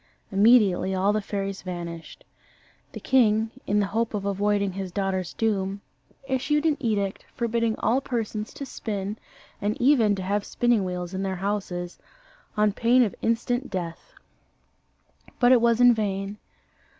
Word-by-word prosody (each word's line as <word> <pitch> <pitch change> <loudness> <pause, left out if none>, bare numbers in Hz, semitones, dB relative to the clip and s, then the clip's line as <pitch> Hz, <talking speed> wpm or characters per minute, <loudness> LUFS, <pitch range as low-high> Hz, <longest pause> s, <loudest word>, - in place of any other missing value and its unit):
Immediately 200 -3 +4
all 195 +2 +2
the 215 - 0
fairies 195 -1 -4
vanished. 170 -2 -7 0.7
The - - -6
king, 220 -4 +3 0.2
in 205 +1 +2
the 205 - +2
hope 230 -1 0
of 200 -1 -3
avoiding 200 0 +1
his 190 0 -5
daughter's 190 -2 -2
doom, 200 -3 -1 0.5
issued 285 +3 0
an 310 -2 +3
edict, 205 -6 -1
forbidding 230 -2 0
all 245 +5 +1
persons 225 -4 -3
to 280 - -6
spin, 205 -4 -4 0.4
and 210 +2 -1
even 240 -6 +4
to 190 - -5
have 200 +2 0
spinning 240 -3 +1
wheels 180 -1 -4
in 190 - -3
their 190 -1 -2
houses, 185 -2 -3 0.6
on 210 -1 +3
pain 240 +4 +4
of 205 -6 -1
instant 245 +3 0
death. 170 -3 -6 1.3
But 245 -1 +5
it 250 -2 +6
was 235 0 +3
in 245 0 +7
vain. 200 -1 -3
210 Hz, 150 wpm, -25 LUFS, 195-230 Hz, 1.3 s, in